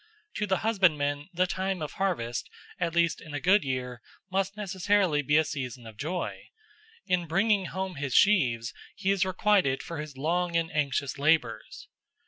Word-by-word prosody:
To 210 - -1
the 190 -1 +2
husbandman 150 -9 +2
the 180 0 +2
time 190 0 -2
of 150 - -5
harvest, 120 - -2 0.3
at 170 -2 -1
least 170 -1 +2
in 155 -2 -8
a - - -1
good 190 +7 +4
year, 125 -3 -3 0.3
must 195 +1 -1
necessarily 190 -5 +1
be 150 +1 +2
a 160 - +5
season 125 -5 -5
of 110 -1 -10
joy: 165 +10 -4 0.6
in 180 -2 0
bringing 195 +4 +2
home 190 -1 -4
his 140 -2 -2
sheaves 125 - +3 0.2
he 195 0 0
is 195 -2 +2
requited 185 -7 +2
for 165 -2 -6
his 150 -3 -7
long 170 +4 0
and 165 -1 +1
anxious 140 -1 -1
labours. 145 -6 0
170 Hz, 165 wpm, -28 LUFS, 140-190 Hz, 0.6 s, a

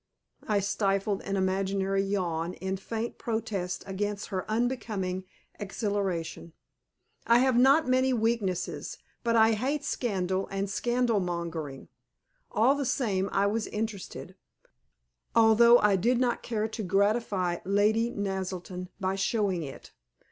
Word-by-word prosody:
I 205 -2 +2
stifled 195 0 0
an 200 - -2
imaginary 195 +1 0
yawn 180 -4 -2
in 190 0 -3
faint 225 +4 -5
protest 220 -6 -3
against 205 +1 -3
her 190 -1 -4
unbecoming 215 -6 -1 0.3
exhilaration. 195 -5 -3 0.7
I 235 - +6
have 260 0 +3
not 270 +4 +5
many 260 +1 +3
weaknesses, 225 -6 -1 0.3
but 230 -1 +1
I 220 0 +6
hate 270 +7 -1
scandal 190 -5 -1
and 195 0 -2
scandal 240 0 +1
mongering. 170 -6 -4 0.6
All 240 +5 +4
the 285 0 -2
same 205 -7 0
I 200 - +2
was 215 +2 0
interested, 210 -2 -5 1.0
although 230 +1 +7
I 210 -4 +3
did 235 +7 +2
not 245 -2 +1
care 220 -2 -1
to 220 +1 -6
gratify 200 -2 +1
Lady 210 +4 +2
Naselton 185 -3 -4
by 190 -1 0
showing 195 -2 0
it. 140 -4 -9
200 Hz, 125 wpm, -28 LUFS, 190-230 Hz, 1.0 s, although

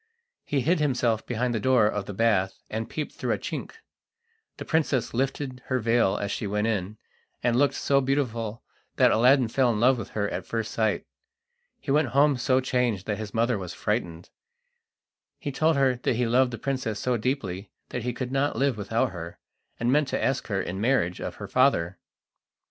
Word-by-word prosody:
He 140 -2 0
hid 170 +7 +2
himself 125 -6 +1
behind 120 +1 -1
the 110 - 0
door 125 -1 +4
of 105 -1 -1
the 100 - -5
bath, 100 -4 +2
and 110 +1 -3
peeped 155 -2 -4
through - - -2
a - - -1
chink. - - -5 0.8
The - - -7
princess 150 -6 0
lifted 130 +1 -2
her 130 - +1
veil 115 -4 +2
as 100 0 -3
she 105 - -3
went 105 +1 0
in, 105 -2 -2 0.5
and 120 -1 +2
looked 140 +3 +3
so 140 0 +2
beautiful 120 -5 -1 0.3
that - - +5
Aladdin 125 +2 +5
fell 125 +2 +2
in 105 - -1
love 125 +2 +4
with 110 - -6
her 100 -1 +1
at - - -4
first 115 -1 -3
sight. 110 -2 0 0.7
He 140 - -4
went 150 0 +3
home 145 0 +5
so 130 +1 +2
changed 125 -7 0
that 105 0 -2
his 110 -1 -6
mother 115 -1 +1
was 90 -3 -6
frightened. 85 0 -3 1.1
He 145 - -4
told 160 +4 +2
her 130 -3 +2
he 125 0 +1
loved 125 +2 +3
the 120 - -6
princess 130 -3 -2
so 125 -1 0
deeply 105 -6 -2 0.2
that 125 - -4
he 125 +2 -2
could 125 +1 -5
not 135 +2 +1
live 135 -4 +1
without 115 +4 0
her, 85 -1 -8 0.4
and 120 +1 +1
meant 150 +1 +3
to - - -2
ask 135 - 0
her 100 -3 -1
in 95 +1 -4
marriage 110 -8 +1
of - - -4
her - - -7
father. 95 -9 +2
120 Hz, 195 wpm, -26 LUFS, 105-130 Hz, 1.1 s, that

